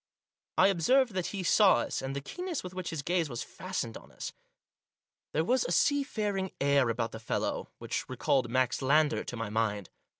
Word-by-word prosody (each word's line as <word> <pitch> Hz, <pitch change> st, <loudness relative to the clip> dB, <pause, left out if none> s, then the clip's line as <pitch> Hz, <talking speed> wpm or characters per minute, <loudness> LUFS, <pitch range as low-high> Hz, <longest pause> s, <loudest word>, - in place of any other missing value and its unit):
I -, -, +6 dB
observed 235 Hz, +7 st, +3 dB
that 185 Hz, -2 st, -1 dB
he 195 Hz, -2 st, -4 dB
saw 195 Hz, +3 st, +6 dB
us, 120 Hz, -, -1 dB
and 135 Hz, +1 st, -4 dB
the 140 Hz, -, -3 dB
keenness 360 Hz, -, -4 dB
with 180 Hz, 0 st, -7 dB
which 185 Hz, -1 st, -4 dB
his 155 Hz, -4 st, -4 dB
gaze 170 Hz, -1 st, +1 dB
was 120 Hz, -2 st, -4 dB
fastened 185 Hz, -12 st, -5 dB
on -, -, -16 dB
us. -, -, -6 dB, 1.0 s
There 160 Hz, +2 st, +1 dB
was 255 Hz, +5 st, +3 dB
a -, -, -3 dB
seafaring 210 Hz, -, +1 dB
air 140 Hz, -3 st, +3 dB
about 115 Hz, 0 st, -1 dB
the 110 Hz, -, -7 dB
fellow 115 Hz, -, -2 dB
which -, -, -4 dB
recalled 130 Hz, -4 st, +1 dB
Max 130 Hz, +1 st, +1 dB
Lander 150 Hz, +3 st, +3 dB
to 120 Hz, -, -6 dB
my 115 Hz, -2 st, -4 dB
mind. 105 Hz, -3 st, -1 dB
155 Hz, 190 wpm, -30 LUFS, 125-190 Hz, 1.0 s, I